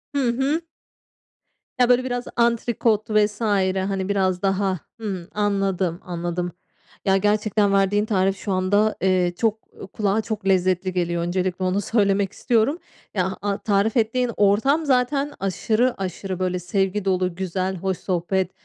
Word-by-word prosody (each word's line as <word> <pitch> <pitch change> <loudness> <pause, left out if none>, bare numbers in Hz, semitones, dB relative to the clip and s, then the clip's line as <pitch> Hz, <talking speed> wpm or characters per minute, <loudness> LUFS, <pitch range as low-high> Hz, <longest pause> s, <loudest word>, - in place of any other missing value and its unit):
Hı - - +2
hı. 275 +7 0 1.2
Ya 245 0 +4
böyle 250 +1 +4
biraz 245 -1 -3
antrikot 235 -2 +1
vs. 210 0 +1
hani 195 -2 0
biraz 185 -2 +1
daha 195 -2 0 0.2
Hımm, 190 -6 -4
anladım, 195 -4 0
anladım. 175 0 -3 0.5
Ya 195 0 +4
gerçekten 210 0 +2
verdiğin 200 +1 +2
tarif 195 -2 +1
şu 200 - -4
anda, 205 +3 +2
eee, 185 -2 +2
çok 220 0 +1 0.3
kulağa 210 0 +1
çok 215 -3 -4
lezzetli 185 0 +2
geliyor. 175 -1 -1
Öncelikle 185 +1 -1
onu 190 +2 +1
söylemek 200 -2 +1
istiyorum. 240 +5 +1 0.4
Ya 190 -1 -1
a 200 -1 -1
tarif 210 +2 +1
ettiğin 235 +2 +1
ortam 225 +10 +3
zaten 275 +2 +1
aşırı 220 +6 0
aşırı 185 0 -4
böyle 180 -1 -1
sevgi 195 +2 -1
dolu, 185 -2 0
güzel, 185 +1 -2
hoş 190 0 -2
sohbet. 185 0 -1
195 Hz, 140 wpm, -23 LUFS, 185-220 Hz, 1.2 s, Ya